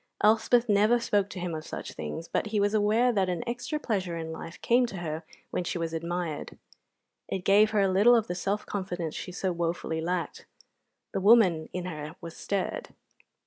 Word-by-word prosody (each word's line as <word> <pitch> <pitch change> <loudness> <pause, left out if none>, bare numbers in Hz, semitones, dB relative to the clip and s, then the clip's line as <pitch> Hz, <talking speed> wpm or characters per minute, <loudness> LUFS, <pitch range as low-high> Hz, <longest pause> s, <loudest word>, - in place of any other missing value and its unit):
Elspeth 225 +3 +4
never 210 +3 +4
spoke 205 -4 +1
to 185 - -7
him 175 -1 -3
of 155 -1 -4
such - - -7
things, 80 - -6
but - - -1
he 210 -1 0
was 205 +1 +2
aware 220 +4 +3
that 195 -5 +1
an 175 -2 -2
extra 245 +6 -3
pleasure 190 - -2
in 160 -1 -5
life 165 +1 -8
came 245 +1 +4
to 195 - -7
her 160 -2 -4 0.3
when - - -1
she 175 - -3
was 165 -1 -3
admired; 170 -1 -3 0.7
it 190 -1 -4
gave 205 +2 +6
her 215 -2 +2
a 195 - +4
little 205 +6 +5
of 225 -2 +2
the 175 - -3
self 195 +4 -2
confidence 180 -5 -3
she - - -6
so 185 +1 -1
wofully 170 -1 -2
lacked; 175 +1 -3 0.6
the 195 - -2
woman 190 -7 +5
in 180 -1 -4
her 155 -3 -6
was 165 -1 -9
stirred. 200 - -3
185 Hz, 195 wpm, -28 LUFS, 170-215 Hz, 0.7 s, gave